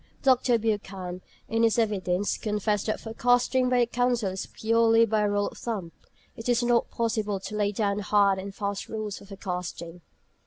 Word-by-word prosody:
Dr. 255 -3 +4
Buchan, 195 -5 -3 0.3
in 225 +1 0
his 230 0 +3
evidence, 200 -4 0
confessed 210 -1 -1
that 215 - -1
forecasting 245 +3 +2
by 250 -1 +3
the - - +4
Council 240 -4 0
is 190 - -5
purely 230 0 +3
"by 215 -1 +1
rule 205 -1 +1
of - - -14
thumb." 200 -8 -4 0.4
It 225 +2 -5
is 240 0 +3
not 240 -1 +2
possible 215 -3 -1
to 210 - -6
lay 205 -1 +1
down 205 -1 0
hard 200 -1 +3
and 195 +1 -6
fast 200 -1 -3
rules 215 -2 -4
for - - -14
forecasting. 180 -3 -6
210 Hz, 170 wpm, -27 LUFS, 200-230 Hz, 0.4 s, Dr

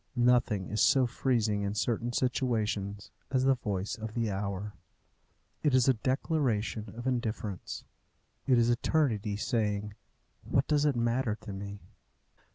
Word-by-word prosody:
Nothing 120 -6 +3
is 105 - 0
so 135 -2 +5
freezing 115 -4 0
in 100 +1 -2
certain 120 +2 0
situations 110 -5 -1 0.2
as 130 -1 +1
the 135 0 +5
voice 105 -5 -3
of 110 -1 -7
the 115 -3 0
hour. 100 +1 -3 0.9
It 145 -4 +3
is 130 -1 +4
a 135 - +6
declaration 120 - -1
of 120 - -6
indifference. 110 -6 -3 0.6
It 130 -2 +5
is 120 0 +4
Eternity 120 -6 +1
saying, 105 -2 -1 0.5
"What 135 - +1
does 150 -1 +3
it 145 -3 +2
matter 120 -1 +1
to 105 - -7
me?" 100 +1 -7
115 Hz, 140 wpm, -30 LUFS, 105-130 Hz, 0.9 s, a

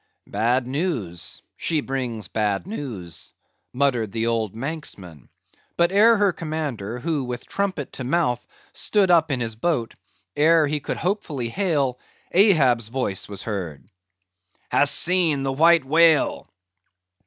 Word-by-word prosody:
"Bad 120 +5 0
news; 125 - -3
she 160 -2 0
brings 125 -6 -3
bad 105 -3 -1
news," 115 - -6 0.4
muttered 125 -6 0
the 115 +1 -2
old 115 -3 -1
Manxman. 110 - -6 0.5
But 170 +1 +3
ere 220 +3 +5
her 200 -3 +2
commander, 145 - -4
who, 150 +1 -2
with 125 -1 -5
trumpet 190 -8 -3
to 130 - -5
mouth, 125 -3 0 0.3
stood 200 -4 +2
up 165 -2 +4
in 130 -3 -1
his 115 -2 -3
boat; 120 -2 -1 0.4
ere 155 +2 +4
he 150 +1 -1
could - - -4
hopefully 160 - -2
hail, 140 - 0 0.3
Ahab's 140 - +4
voice 115 -6 -3
was 100 -1 -5
heard. 90 -9 -5 0.9
"Hast - - +4
seen 165 -6 +2
the 135 0 -1
White 165 +1 +5
Whale?" 160 +1 +3
135 Hz, 130 wpm, -23 LUFS, 115-165 Hz, 0.9 s, ere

